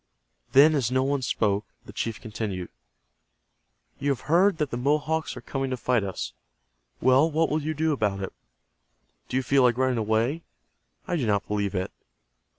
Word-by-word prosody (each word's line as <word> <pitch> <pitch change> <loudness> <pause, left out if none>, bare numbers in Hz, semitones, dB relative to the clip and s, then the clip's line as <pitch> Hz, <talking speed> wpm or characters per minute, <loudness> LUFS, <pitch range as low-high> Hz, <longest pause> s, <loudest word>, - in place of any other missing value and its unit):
Then 145 +4 +7
as 135 -6 +1
no 130 +1 +2
one 140 0 0
spoke, 105 -4 0 0.2
the - - -11
chief 115 -2 -3
continued. 105 -5 -5 1.3
"You 145 - -1
have 135 - 0
heard 175 +4 +3
that 150 -4 -1
the 120 - -2
Mohawks 150 +4 0
are - - -7
coming 135 -1 -3
to 130 - -2
fight 120 -3 +1
us. 95 -1 -4 0.7
Well, 130 +5 +5
what 160 0 +1
will 155 +1 +1
you 155 +2 -3
do 160 +1 +1
about 105 -7 0
it? 95 - -5 1.0
Do 130 - 0
you 130 - 0
feel 135 +2 +3
like 125 -2 +4
running 130 -2 +1
away? 110 +8 0 0.7
I 175 - 0
do 130 -7 -1
not 100 -2 +1
believe 100 -2 -1
it. 95 0 -2
130 Hz, 175 wpm, -26 LUFS, 110-150 Hz, 1.3 s, Then